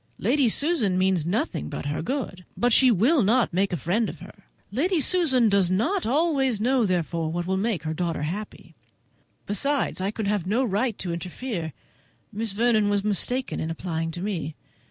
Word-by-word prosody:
Lady 255 +3 +2
Susan 255 - +2
means 185 -4 +2
nothing 170 - -1
but - - -6
her 145 +1 -2
good, 205 - -4
but 245 -1 +2
she 260 +2 +6
will 245 - +4
not 225 0 +2
make 195 +2 +1
a 175 - -1
friend 195 - 0
of - - -9
her. - - -14 0.3
Lady 330 - +1
Susan 280 -7 +3
does 200 -3 +3
not 300 - 0
always 270 -4 +2
know, 245 0 +2
therefore, 170 -3 -1
what 175 +1 -2
will 190 +1 0
make 195 -4 -1
her 155 0 -2
daughter 165 -2 -2
happy. 200 +8 -6 0.7
Besides, 275 +1 0
I 190 - 0
could 215 0 -4
have 200 -3 -1
no 230 +7 +2
right 225 0 0
to 175 -2 -3
interfere. 175 0 -4 0.6
Miss 220 +1 -2
Vernon 220 -1 +2
was 205 -1 +1
mistaken 240 +5 -1
in 160 - -3
applying 165 -1 -3
to 175 +2 -6
me. 165 -7 -3
205 Hz, 180 wpm, -25 LUFS, 175-250 Hz, 0.7 s, she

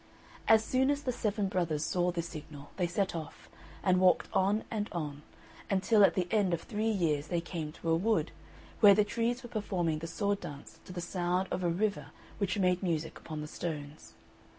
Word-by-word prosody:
As 220 -1 +6
soon 260 +1 +2
as 290 0 0
the 255 - 0
seven 210 -3 -1
brothers 165 -5 0
saw 180 0 +1
this 170 -1 -2
signal, 145 -3 -9
they 180 -2 +1
set 185 +1 -1
off, 160 -2 -7 0.4
and 185 -1 +4
walked 185 -1 +4
on 200 +3 +2
and 210 -2 -2
on, 150 -4 -4 0.5
until 205 +2 +4
at - - +5
the 180 -2 0
end 200 -5 +3
of 165 - -9
three 215 +2 -1
years 160 -8 0
they 175 - 0
came 165 -3 -5
to 165 - -5
a - - +5
wood, 215 +7 +1 0.5
where 205 -2 +8
the 210 - +5
trees 235 +4 -1
were 240 - -8
performing 180 -8 -1
the 165 - -5
sword 200 +4 -1
dance 145 -1 -9
to - - -10
the 180 -1 -4
sound 180 +1 -1
of 180 - -2
a 175 - +2
river 200 +5 -1 0.3
which 200 -1 0
made 180 -2 +2
music 165 -4 -2
upon 155 -2 -6
the 150 - -5
stones. 150 -2 -6
180 Hz, 200 wpm, -31 LUFS, 165-205 Hz, 0.5 s, where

